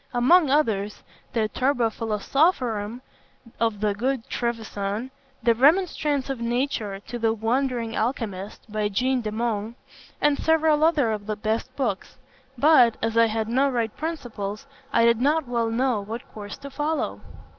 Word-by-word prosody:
Among 290 +6 +5
others, 215 -8 0 0.3
the 220 -2 +1
Turba 245 0 +1
Philosophorum 230 - 0 0.6
of 225 -3 0
the 210 -1 +2
Good 255 +3 -2
Trevisan, 225 0 -3 0.3
the 235 - +5
Remonstrance 295 0 +2
of 270 -3 -3
Nature 235 -4 -1
to 240 +3 -7
the 225 -1 +2
Wandering 235 +1 -1
Alchymist, 215 -4 -3
by 210 -1 0
Jean 255 +5 +1
de 215 -2 -3
Meung, 225 0 -2 0.4
and 295 -1 +2
several 315 -1 +3
others 295 -9 +3
of 205 -1 -6
the 215 - -1
best 220 +4 -2
books; 240 -7 -3 0.4
but, 250 -4 +5
as 225 0 0
I 230 0 +5
had 220 0 -2
no 265 +4 +2
right 235 -4 -1
principles, 245 -9 -5 0.3
I 230 - +4
did 235 0 +3
not 295 +1 +2
well 235 -2 0
know 240 -1 +1
what 225 +4 -7
course 205 -1 -7
to 280 0 -10
follow. 300 +3 -2
235 Hz, 150 wpm, -25 LUFS, 215-270 Hz, 0.6 s, Among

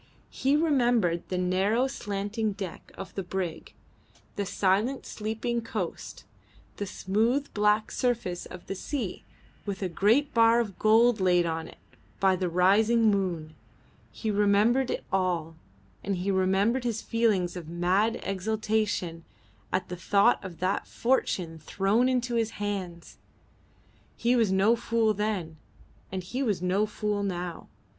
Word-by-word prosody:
He 275 +2 +1
remembered 240 - +2
the 185 - -1
narrow 190 +7 +2
slanting 210 -3 -3
deck 195 -3 -7
of 195 - -8
the 195 - -3
brig, 180 -3 -5 0.6
the 200 -1 -2
silent 205 +9 +1
sleeping 225 +2 -3
coast, 215 -6 -5 0.5
the 205 - -3
smooth 225 +10 0
black 210 +1 +2
surface 235 -8 -1
of 180 - -10
the - - -4
sea 215 0 -4 0.4
with 200 -1 -4
a - - +1
great 225 - +2
bar 230 0 +5
of 210 -5 -3
gold 225 +1 +4
laid 180 -2 +3
on 160 -1 -3
it - - -14 0.4
by 190 -1 +4
the 180 -1 -1
rising 215 +6 +4
moon. 175 -6 -2 0.6
He 220 - -3
remembered 210 +5 +3
it - - -2
all, 175 -4 0 0.5
and 195 0 -1
he 185 +2 -1
remembered 195 +6 +2
his 230 -3 -2
feelings 210 -7 +1
of 170 -3 -7
mad 185 +6 +1
exultation 205 -3 -1 0.5
at 185 0 -1
the 180 - -5
thought 200 +6 +3
of 180 -3 -8
that 185 +2 -1
fortune 180 -9 0
thrown 200 +10 +1
into 245 -1 0
his 225 -1 0
hands. 190 -5 -5 1.0
He 240 +1 +2
was 225 -5 +3
no 195 +5 +4
fool 230 -1 +1
then, 200 -6 -2 0.5
and 185 -1 -4
he 245 +9 -4
was 215 -8 0
no 185 +4 +1
fool 210 -1 -2
now. 180 -3 -4
200 Hz, 140 wpm, -28 LUFS, 185-230 Hz, 1.0 s, bar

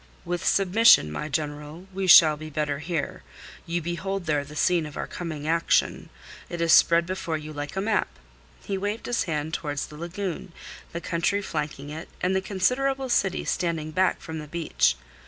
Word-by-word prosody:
"With 175 0 -3
submission, 195 - +5
my 150 - -4
General, 150 +3 -4
we 190 0 -2
shall 155 -3 +9
be 155 +1 -8
better 150 -1 -2
here. 160 0 -3 0.5
You 170 0 -2
behold 185 +3 -3
there 150 -3 +1
the 145 +2 -12
scene 170 0 +2
of 150 - -10
our - - -2
coming 155 -4 -6
action. 165 +1 +1 0.4
It 175 - -5
is 165 -1 +4
spread 170 +1 +6
before 170 -3 -3
you 155 0 -8
like 145 +2 -6
a 190 - -1
map." 215 +2 +1 0.6
He 195 -1 -3
waved 205 +3 -3
his 245 - 0
hand 155 -2 -3
towards 145 -4 -2
the 150 - -12
lagoon, 175 +1 -5 0.4
the 170 - -5
country 185 +4 0
flanking 150 -4 -4
it 160 +2 -7
and 185 +1 0
the 190 - +1
considerable 255 +8 0
city 190 -6 +1
standing 165 -4 -1
back 185 +3 +1
from 160 -1 -6
the 150 - -8
beach. 155 - +1
170 Hz, 180 wpm, -26 LUFS, 150-190 Hz, 0.6 s, shall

